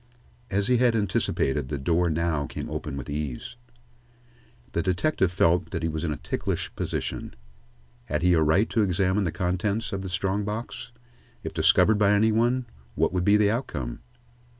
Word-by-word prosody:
As 100 0 0
he 125 +3 +3
had 120 -1 +3
anticipated, 75 -9 0
the 75 - -2
door 85 +5 +1
now 80 -3 0
came - - -6
open 70 - -4
with 65 - -6
ease. 75 - -4 1.2
The 85 - 0
detective 95 - +1
felt 90 0 +2
that 80 -2 -4
he 80 - +1
was 80 +1 -3
in 80 - -1
a 75 - -3
ticklish 75 +1 -3
position. - - -4 0.7
Had 75 +4 -2
he 90 0 +5
a 80 - +4
right 80 +8 +3
to 115 - +2
examine 95 0 +1
the 85 - -1
contents 100 +6 -1
of 95 - -2
this 95 -2 -6
strong 95 +2 0
box? 110 +2 -5 0.5
If - - -5
discovered 110 -1 +4
by 105 -1 +4
any 110 +2 +4
one, 120 +3 +1 0.3
what - - +1
would 90 -1 0
be 100 +2 +5
the 105 -1 +3
outcome? 75 - -3
95 Hz, 175 wpm, -26 LUFS, 80-105 Hz, 1.2 s, he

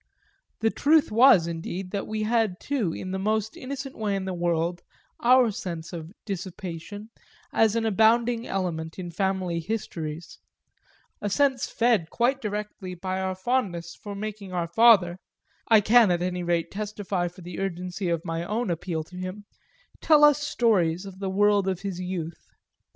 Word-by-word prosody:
The 225 0 +2
truth 305 -2 +3
was 230 -6 +6
indeed 170 +3 -5
that 200 -1 -3
we 215 0 -2
had 220 -4 +1
too, 250 -12 -1
in 185 +3 -6
the 190 - -2
most 215 +2 -1
innocent 275 +1 -6
way 210 -2 -1
in 195 -1 -3
the 190 - -3
world, 175 0 -1 0.4
our 250 -1 +5
sense 170 -3 -6
of 165 -1 -7
"dissipation" 190 +1 -6 0.4
as 225 -1 +3
an 230 -1 0
abounding 230 +2 +3
element 165 -4 -3
in 175 -2 -6
family 185 -1 -1
histories; 165 -4 -5 0.8
a 205 - -1
sense 265 +3 +2
fed 225 -9 +1
quite 260 +3 +1
directly 210 -3 -5
by 185 +1 -3
our 190 0 -2
fondness 185 -6 -1
for 205 -1 -8
making 205 -1 -6
our 175 -2 -1
father 185 -2 +5 0.5
I 220 -2 +6
can 225 +1 +6
at 175 0 +1
any 180 0 -2
rate 170 -1 -1
testify 200 -3 -3
for 180 +2 -11
the 175 0 -7
urgency 180 0 -3
of 170 0 -1
my 165 0 -2
own 215 +2 -1
appeal 165 -1 -3
to 180 +4 -15
him 185 +3 -6 0.6
tell 305 -2 +5
us 295 -1 +6
stories 195 - +1
of 190 -1 -10
the 195 -1 -2
world 205 0 +3
of 190 -1 -1
his 195 -3 -4
youth. 175 -3 -5
190 Hz, 165 wpm, -26 LUFS, 175-220 Hz, 0.8 s, was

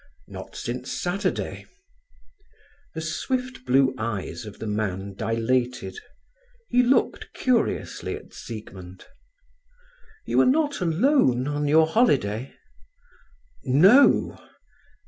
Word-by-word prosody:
"Not - - -10
since 125 +2 -5
Saturday." 195 +4 -3 1.3
The 160 - -3
swift 255 +11 -3
blue 130 +1 +4
eyes 110 +1 -4
of 105 - -10
the - - -7
man 100 -2 -3
dilated. 120 - -1 0.7
He 250 - +4
looked 250 +2 +1
curiously 250 -3 -1
at - - -13
Siegmund. 95 -5 -10 1.2
"You - - +3
are - - +4
not 290 -1 +1
alone 165 - +2
on 145 0 -1
your 160 +2 +5
holiday?" 135 - +1 1.1
"No." 190 - +5
135 Hz, 95 wpm, -24 LUFS, -, 1.3 s, your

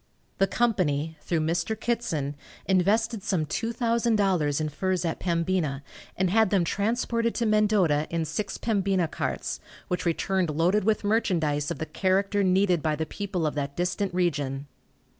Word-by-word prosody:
The 195 - +4
company, 165 -11 0
through 165 -2 -1
Mr. 175 +7 -1
Kittson, 165 - -1 0.3
invested 205 +4 +2
some 180 -5 0
$2,000 220 - +1
in 155 - -1
furs 185 +4 -1
at 165 - -2
Pembina, 170 -5 0 0.3
and 185 -1 +1
had 220 0 +4
them 195 -3 +3
transported 230 +4 0
to 235 - 0
Mendota 205 -8 +3
in 165 -1 -1
six 190 +6 -3
Pembina 195 -5 +1
carts, - - -3 0.3
which 180 -1 -1
returned 185 +1 0
loaded 175 +7 +2
with 220 0 +2
merchandise 165 -9 +1
of 170 - -3
the 160 - -3
character 195 +3 +1
needed 185 -2 +3
by 155 0 0
the 160 +1 -2
people 190 -1 -3
of 150 - 0
that 140 -1 -3
distant 180 +2 -1
region. 145 -6 -1
185 Hz, 150 wpm, -26 LUFS, 160-210 Hz, 0.3 s, The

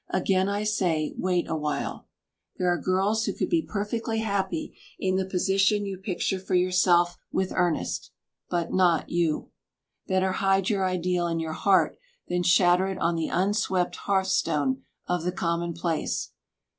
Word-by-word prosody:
Again 190 +1 +1
I 205 +1 -1
say, 180 -8 0
wait 180 -2 0
awhile. 150 -2 -3 0.5
There 180 -1 +1
are 175 - 0
girls 195 +4 +1
who - - -1
could - - -3
be 335 -1 +3
perfectly 225 0 -3
happy 205 +9 -2 0.2
in 185 0 0
the 190 0 0
position 195 +2 +2
you 195 -2 -5
picture 190 0 -2
for 185 0 -2
yourself 180 -1 +3
with 190 -1 -1
Ernest, 175 -3 0 0.4
but 175 -2 -1
not 175 -4 +2
you. 170 -3 0 0.6
Better 190 0 +1
hide 195 +1 +2
your 195 -2 +1
ideal 180 -1 0
in 165 -1 -1
your 160 -1 -3
heart 195 +3 +2 0.3
than 180 0 0
shatter 180 +1 +4
it 190 - -3
on 170 - +1
the 165 -1 -1
unswept 190 -1 0
hearthstone 160 -9 0 0.3
of 180 -1 0
the 180 - 0
commonplace. 170 -1 -2
185 Hz, 150 wpm, -26 LUFS, 175-195 Hz, 0.6 s, shatter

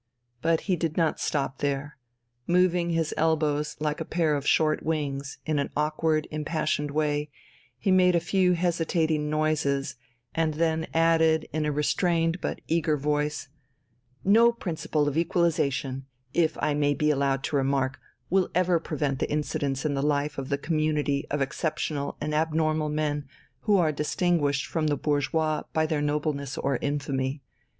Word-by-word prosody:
But 165 +2 +2
he 190 - 0
did 165 -2 -2
not 165 -3 +1
stop 135 -2 -1
there: 145 +1 -2 0.5
moving 180 -1 +3
his 165 -2 0
elbows 150 -2 +1
like 150 0 -1
a - - 0
pair 165 -3 +1
of 140 0 -3
short 155 -1 +3
wings, 140 -3 -3
in 155 -2 0
an 140 - -1
awkward, 155 +1 +1
impassioned 155 -1 -1
way, 150 0 0 0.5
he 195 - 0
made 180 -1 +5
a - - +4
few 180 +1 +2
hesitating 165 -3 0
noises, 150 -3 0 0.4
and 160 -2 0
then 160 0 0
added 160 -1 +3
in 155 0 0
a - - +1
restrained 165 +3 +1
but - - -3
eager 160 -2 +1
voice: 150 0 -1 0.7
"No 230 +4 +6
principle 160 -8 -2
of 145 +2 +1
equalization, 145 -6 0 0.3
if 165 -2 +2
I 150 - +1
may 145 0 +1
be 150 +1 +2
allowed 135 -1 0
to 155 - -2
remark, 135 -1 0 0.3
will 185 0 +2
ever 180 -1 +3
prevent 145 -4 -2
the - - -1
incidence 145 -2 -1
in 150 - +1
the 135 - -1
life 145 0 0
of 135 - -5
the 140 - +1
community 150 -2 0
of 145 -1 +1
exceptional 145 0 -3
and 150 - -3
abnormal 155 0 +1
men 150 -1 -1 0.3
who 205 +7 +3
are 165 -4 +3
distinguished 150 -2 0
from 160 -2 -1
the 145 -1 +1
bourgeois 150 +2 0
by 160 0 +2
their 155 -1 -1
nobleness 145 -2 -1
or 135 -2 0
infamy. 140 -1 -2
150 Hz, 160 wpm, -27 LUFS, 145-165 Hz, 0.7 s, No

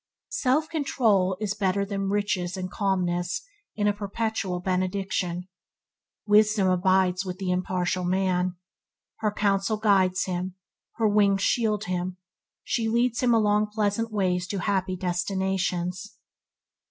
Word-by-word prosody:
Self 300 - +1
control 225 - +1
is 210 -2 -1
better 200 -1 0
than 195 -1 -2
riches 195 -3 -1
and 185 -1 -4
calmness 185 - -1 0.3
is 205 -1 +1
a 205 - +3
perpetual 205 -2 -2
benediction. 185 -1 -2 0.8
Wisdom 210 -1 +4
abides 185 0 +2
with 185 -1 -5
the 190 -1 -2
impartial 180 0 -1
man. 185 0 +1 0.6
Her 215 -1 0
counsels 200 +1 0
guide 195 -4 +4
him; 180 0 -3 0.4
her 225 -2 +1
wings 200 -2 +3
shield 215 -3 +1
him; 180 -1 -3 0.5
she 230 -2 -1
leads 235 +1 +1
him 250 -1 +3
along 210 -1 +3
pleasant 220 +1 0
ways 185 -3 0
to 195 -1 -3
happy 190 -1 0
destinations. 180 +1 -2
195 Hz, 125 wpm, -26 LUFS, 185-210 Hz, 0.8 s, Wisdom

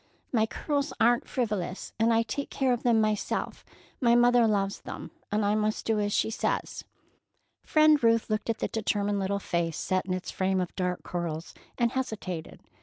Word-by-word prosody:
My 220 -2 +3
curls 285 +4 -2
are 240 +2 +5
n't - - -15
frivolous, 210 -7 -2
and 225 +1 +4
I 230 0 +3
take 255 +6 -4
care 260 -2 +1
of 240 - -2
them 235 -2 +3
myself. 215 -1 -1 0.4
My 235 -3 +4
mother 240 -1 +5
loves 200 -2 0
them, - - -8 0.2
and 210 0 +1
I 205 - +2
must 215 0 0
do 220 -1 +1
as 205 0 0
she 220 - +1
says." - - -2 0.8
Friend 310 -3 +4
Ruth 230 -1 +3
looked 215 +1 -2
at 230 - +1
the - - -1
determined 205 -2 -1
little 195 +1 0
face 170 -4 -2
set 185 0 -1
in 185 - 0
its 185 - -5
frame 190 0 0
of 180 -1 -3
dark 180 -1 -2
curls, 170 -2 -4 0.2
and 235 -1 +2
hesitated. 210 -10 -4
215 Hz, 185 wpm, -28 LUFS, 190-235 Hz, 0.8 s, are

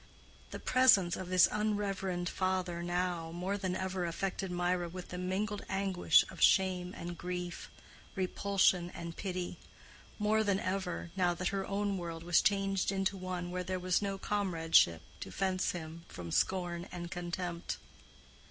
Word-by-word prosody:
The - - -6
presence 250 -9 +5
of 185 -1 -6
this 185 -1 +6
unreverend 195 -4 -1
father 185 -2 -1
now, 175 -1 -1
more 180 +4 -2
than 190 -2 -2
ever, 185 -1 -2
affected 190 +3 -2
Mirah 175 0 0
with 180 +1 -8
the 180 - -5
mingled 200 +3 -2
anguish 190 -4 +4
of - - -10
shame 185 -2 +4
and 175 0 -5
grief, 180 0 -5 0.5
repulsion 190 -2 +2
and 170 -1 -6
pity—more 200 +3 -3
than 200 -2 +2
ever, 185 -3 -3
now 180 -2 +2
that 185 +1 -1
her 195 -1 -2
own 200 -1 -1
world 165 -1 -5
was 175 0 +4
changed 195 -2 +1
into 195 +1 0
one 180 -1 -4
where 180 0 -2
there 185 +1 -2
was 180 +1 +1
no 200 -1 -2
comradeship 165 - +3 0.2
to - - -6
fence 190 -1 0
him 165 -1 -5
from 85 -1 -7
scorn 175 - 0
and 175 -1 -6
contempt. 175 0 -3
185 Hz, 150 wpm, -33 LUFS, 175-195 Hz, 0.5 s, this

